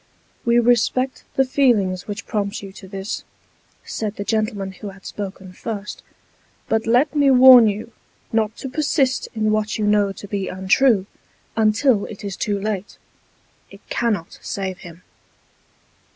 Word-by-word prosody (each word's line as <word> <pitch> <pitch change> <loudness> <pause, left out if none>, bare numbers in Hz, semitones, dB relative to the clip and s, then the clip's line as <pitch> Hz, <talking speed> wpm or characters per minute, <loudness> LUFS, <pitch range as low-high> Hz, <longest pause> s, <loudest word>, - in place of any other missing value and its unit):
"We 235 0 +4
respect 245 +2 +2
the 270 - +3
feelings 220 -9 +1
which 205 +1 -5
prompt 205 -1 -3
you 195 - -8
to 190 0 -12
this," 195 +2 -5 0.6
said 215 -1 -4
the 200 - -4
gentleman 210 -3 -1
who 200 +2 -8
had 195 -1 -15
spoken 190 -2 -7
first, 210 +1 -6 0.3
" - - -38
but 225 0 0
let 260 +6 +3
me 285 -2 +4
warn 255 -3 +9
you, 215 +3 -3 0.4
not 220 0 0
to - - -6
persist 270 -1 0
in 215 -1 +1
what 215 0 0
you 215 - -1
know 205 -1 +3
to 205 - -10
be 200 -2 -3
untrue, 195 +3 +2 0.5
until 220 +1 +3
it 210 -1 -10
is 200 -2 -4
too 205 0 -1
late. 205 -1 -4 0.7
It - - -16
cannot 215 -8 -1
save 190 -2 -4
him." 175 0 -12
215 Hz, 150 wpm, -21 LUFS, 195-235 Hz, 0.7 s, warn